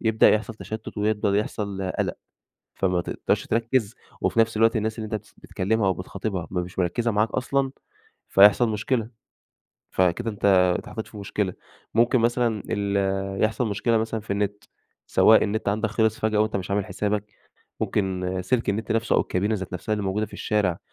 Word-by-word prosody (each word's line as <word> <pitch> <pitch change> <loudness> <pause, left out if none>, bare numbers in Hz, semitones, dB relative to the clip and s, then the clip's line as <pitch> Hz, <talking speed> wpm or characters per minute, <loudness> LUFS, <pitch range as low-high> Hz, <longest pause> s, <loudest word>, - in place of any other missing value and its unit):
يبدأ 110 -1 +4
يحصَل 110 +1 0
تَشتُّت 110 0 -7
ويبدأ 105 -1 +1
يحصَل 100 -3 -3
قلق، - - 0 0.6
فما 90 -2 +1
تقدَرش - - -1
تركِّز، 115 -1 0 0.3
وفي 115 - +1
نفس 115 -1 +3
الوقت 115 +2 +4
الناس 110 +1 -1
اللي 110 - -3
أنت 110 - -7
بتس 105 - -8
بتكلِّمها 100 +2 -1
أو 95 - +3
بتخاطبها 95 -1 -4
ما 90 -1 0
مش 90 +1 -7
مركِّزة 105 +7 +1
معاك 105 +1 +2
أصلًا 135 +1 0 0.6
فيحصَل 105 +4 +6
مشكلة. 110 +2 -1 0.8
فكده 95 +6 +1
أنت 100 - -4 0.3
اتحطَّيت 110 - -7
في 105 - -12
مشكلة، 100 -2 -2 0.4
ممكن 120 +2 +4
مثلًا 115 -2 +1
ال 100 -2 0 0.5
يحصَل 110 +2 +1
مشكلة 115 +3 +1
مثلًا 110 0 -2
في 105 -1 -4
النِّت، 100 0 -2 0.4
سواء 110 - +6
النِّت 110 0 -1
عندك 110 +2 0
خلِص 110 0 +1
فجأة، 110 -1 +1
وأنت 110 0 +1
مش 95 0 -5
عامل 100 -1 +1
حسابك، 105 +2 -1 0.6
ممكن 95 -2 -1
سِلك 115 +6 0
النِّت 105 +3 -1
نَفْسُه 115 0 +1
أو - - +5
الكابينة 100 +4 0
ذات 95 -3 -5
نَفْسها 90 +4 -3
اللي 105 -1 -1
موجودة 100 +3 -1
في - - -21
الشارع، 100 -5 0
105 Hz, 170 wpm, -25 LUFS, 100-110 Hz, 0.8 s, فيحصَل